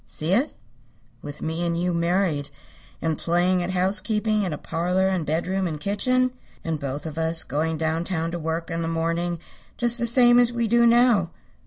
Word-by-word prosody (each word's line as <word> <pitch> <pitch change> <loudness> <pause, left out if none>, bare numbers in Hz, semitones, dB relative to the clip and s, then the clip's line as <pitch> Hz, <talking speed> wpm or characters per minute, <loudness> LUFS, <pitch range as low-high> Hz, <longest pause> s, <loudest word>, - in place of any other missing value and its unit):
See 160 +4 -1
it? 250 +9 +1 0.7
With 145 0 -8
me 160 +2 -2
and 170 -1 -1
you 180 0 0
married, 170 -4 0 0.5
and 160 -1 -1
playing 180 +2 +1
at 175 - -2
housekeeping 210 +3 +1
in 190 -4 -1
a 150 - -3
parlor 180 +5 0
and 185 -5 -1
bedroom 180 +5 -1
and 155 -3 -5
kitchen? 255 - +1 0.3
And 160 -2 -2
both 140 +2 -5
of 160 0 -5
us 160 0 +1
going 160 +2 -2
down 160 +1 -1
town 165 -3 -2
to 175 - -4
work 165 +1 -3
in 165 0 -2
the 165 - -2
morning 165 +1 -1 0.4
just 240 0 +1
the 235 - 0
same 240 0 +5
as 245 -1 +3
we 235 -1 -1
do 235 +1 +4
now. 235 -6 +4
175 Hz, 190 wpm, -24 LUFS, 165-210 Hz, 0.7 s, same